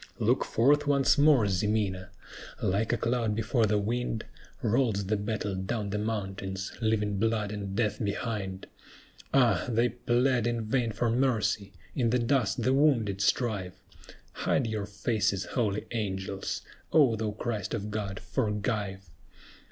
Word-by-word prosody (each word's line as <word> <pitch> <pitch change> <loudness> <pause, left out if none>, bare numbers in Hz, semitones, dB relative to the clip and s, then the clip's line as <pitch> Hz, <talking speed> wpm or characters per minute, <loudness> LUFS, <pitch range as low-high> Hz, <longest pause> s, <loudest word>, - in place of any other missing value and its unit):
Look - - +2
forth 145 +6 +3
once 140 +1 +4
more, 145 -7 +5
Ximena! 95 -1 0 0.5
"Like 100 +4 0
a 120 - +2
cloud 115 -3 0
before 110 +1 +1
the 105 0 +2
wind 115 +2 -2 0.4
Rolls 110 -4 +1
the 105 +3 +1
battle 105 -1 -2
down 100 +2 -3
the 105 - -1
mountains, 95 -3 -3
leaving 105 -2 +1
blood 110 -1 0
and 100 -2 -5
death 105 0 0
behind; 100 -2 -3 0.7
Ah! 125 -4 +3
they 120 +1 +2
plead 120 +1 +1
in 120 -2 -1
vain 115 +1 0
for 115 +2 0
mercy; 110 -5 +1 0.2
in 120 -4 +2
the 125 - +3
dust 125 -2 +1
the 130 - +3
wounded 120 -9 +2
strive; 100 -5 0 0.6
Hide 135 - 0
your 110 -3 -3
faces, 100 -2 0
holy 105 -4 0
angels! 95 -3 -3 0.3
O 135 -8 +5
thou 110 0 -2
Christ 105 -1 -3
of 105 -1 -4
God, 100 -2 -3
forgive!" 105 -3 -2
110 Hz, 140 wpm, -29 LUFS, 100-120 Hz, 0.7 s, more